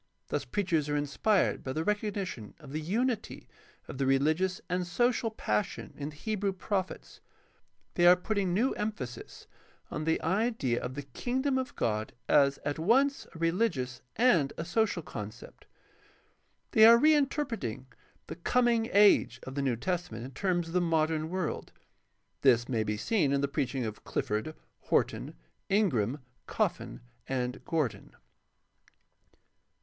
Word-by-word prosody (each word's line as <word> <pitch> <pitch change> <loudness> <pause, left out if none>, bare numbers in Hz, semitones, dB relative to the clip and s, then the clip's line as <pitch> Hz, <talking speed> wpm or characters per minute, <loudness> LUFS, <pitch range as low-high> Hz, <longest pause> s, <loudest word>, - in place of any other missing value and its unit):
Thus - - -2
preachers 170 -7 0
are 145 - 0
inspired 145 +8 +1
by 130 - -3
the 160 - -1
recognition 200 - -3
of - - -12
the 155 +2 -3
unity 225 +7 -2 0.4
of 130 - -8
the 135 - +1
religious 155 +8 +2
and 180 0 -1
social 240 +5 +1
passion 110 - -2
in 145 0 -5
the 150 - -12
Hebrew 205 +3 -2
prophets. 190 0 -4 0.7
They 175 0 +4
are 180 - +9
putting 195 0 -1
new 230 +9 +2
emphasis 205 - -5 0.5
on 155 - -3
the 160 - +2
idea 190 - 0
of 125 +1 -5
the 145 - -5
Kingdom 260 - -1
of 260 +2 -5
God 110 -1 -1
as 140 -1 +4
at 145 +1 -2
once 265 - +2
a - - -7
religious 165 - 0
and 180 - +4
a 165 - -4
social 195 -1 0
concept. 105 -4 -9 1.0
They 220 - +6
are 230 +1 +10
reinterpreting 275 - +1 0.4
"the - - -8
Coming 235 +4 +2
Age" 200 -11 +5
of 130 - -7
the 140 - -2
New 130 -3 +1
Testament 125 -5 -3
in 130 - -8
terms 175 +3 -1
of - - -8
the 180 - +3
modern 160 -2 +1
world. 185 -3 -3 0.7
This 120 -3 +4
may 115 -4 0
be 105 0 -2
seen 150 - +1
in 140 0 +2
the 140 - +1
preach 140 -2 -2
ing 130 -3 -1
of 110 -1 -6
Clifford, 110 +9 -2 0.2
Horton, - - 0 0.3
Ingram, 145 - +1 0.3
Coffin, - - -2 0.3
and 125 -1 -2
Gordon. 155 -8 -2
165 Hz, 145 wpm, -30 LUFS, 135-210 Hz, 1.0 s, are